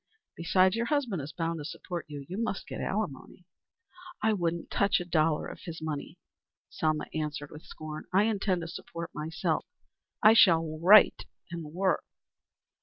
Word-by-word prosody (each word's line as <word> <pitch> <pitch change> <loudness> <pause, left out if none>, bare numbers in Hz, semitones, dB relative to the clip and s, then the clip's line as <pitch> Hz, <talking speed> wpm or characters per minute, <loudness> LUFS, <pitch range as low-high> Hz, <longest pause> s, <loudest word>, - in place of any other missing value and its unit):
Besides 185 +3 +3
your 235 +1 -1
husband 255 - 0
is 140 +3 -7
bound 165 0 -2
to - - -6
support 170 +2 -6
you. 145 -2 -8
You 190 +5 -4
must 230 -4 -2
get - - -6
alimony." 180 -4 -4 0.7
"I 220 0 +2
wouldn't 170 -3 -2
touch 200 -2 +2
a 175 - -5
dollar 160 -2 +1
of - - -8
his 165 -1 -6
money," 155 -2 -5 0.5
Selma 155 -1 0
answered 150 -2 -4
with 150 +1 -11
scorn. 155 0 -8
"I 190 +2 +4
intend 200 -4 0
to 165 - -5
support 170 0 -7
myself. 160 +3 -2 0.6
I 215 - +9
shall 165 -8 +4
write 195 +5 +6 0.3
work." 170 +4 -1
170 Hz, 155 wpm, -29 LUFS, 155-195 Hz, 0.7 s, I